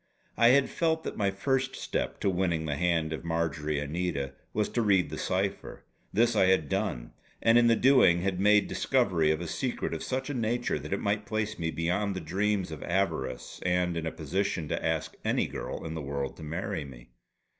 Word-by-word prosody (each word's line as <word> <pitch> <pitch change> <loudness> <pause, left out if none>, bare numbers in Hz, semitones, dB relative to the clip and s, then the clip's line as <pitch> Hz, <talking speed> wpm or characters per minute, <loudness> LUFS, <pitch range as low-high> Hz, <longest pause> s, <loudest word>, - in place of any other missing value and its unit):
I 115 +2 +5
had 130 +2 +5
felt 160 -1 0
that - - -4
my 100 -2 +1
first 130 +7 -1
step - - -3
to - - +2
winning 85 -3 0
the 75 -2 -1
hand 80 -1 +1
of 80 - -5
Marjory 80 -2 -1
Anita 75 -2 -2 0.2
was 105 -1 0
to 120 - 0
read 95 -8 +3
the 80 - -4
cipher. 95 +1 -2 0.3
This 115 +2 +3
I 95 -3 +4
had 95 -6 +2
done; - - -2 0.3
and 115 0 +4
in 120 0 +6
the 115 - +5
doing 115 -9 +5
had 95 -2 -1
made 105 +1 +5
discovery 95 -12 +2
of 80 +2 +1
a 85 - -4
secret 125 +9 -2
of - - -4
such 130 +1 -2
a 145 - -3
nature 120 - -1
that 75 +2 -8
it 100 - 0
might 105 0 -1
place 110 -1 -2
me 80 -1 -1
beyond 90 +5 -1
the - - -2
dreams 95 +3 -1
of 80 - -7
avarice, 85 -6 -2
and 90 -1 +1
in 80 -1 -2
a - - -2
position 90 +1 -2
to - - -2
ask - - -1
any - - +1
girl - - -5
in 80 - -4
the 80 - -4
world 70 -1 -3
to - - -12
marry 90 +3 -3
me. - - -13
95 Hz, 210 wpm, -29 LUFS, 80-105 Hz, 0.3 s, in